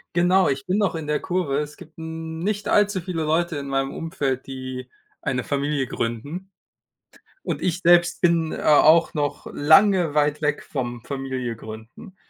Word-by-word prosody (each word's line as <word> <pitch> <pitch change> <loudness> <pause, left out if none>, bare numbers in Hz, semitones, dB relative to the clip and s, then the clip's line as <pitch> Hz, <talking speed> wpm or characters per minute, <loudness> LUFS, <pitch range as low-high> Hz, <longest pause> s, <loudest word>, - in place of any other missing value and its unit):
Genau, 180 +2 +4
ich 135 0 -2
bin 190 +3 0
noch 200 -4 +1
in 160 -1 -4
der 150 0 0
Kurve. 175 -7 -1
Es 150 0 -5
gibt 160 - -15
n 160 0 -6
nicht 205 +3 -2
allzu 205 -2 +3
viele 175 -2 -4
Leute 160 +1 0
in 140 -1 -5
meinem 135 0 -1
Umfeld, 140 -5 -3
die 130 -1 -6 0.3
eine 125 -2 -1
Familie 140 0 -1
gründen. 145 - -4 0.9
Und - - -4
ich 180 -1 0
selbst 175 -1 +4
bin, 170 -2 +2
a 150 - +4
auch 165 +2 +5
noch 145 -1 -2
lange 175 +2 +4
weit 150 0 +1
weg 150 0 0
vom 120 -4 -4
Familie 130 -3 -4
gründen. 110 - -11
150 Hz, 165 wpm, -23 LUFS, 135-175 Hz, 0.9 s, auch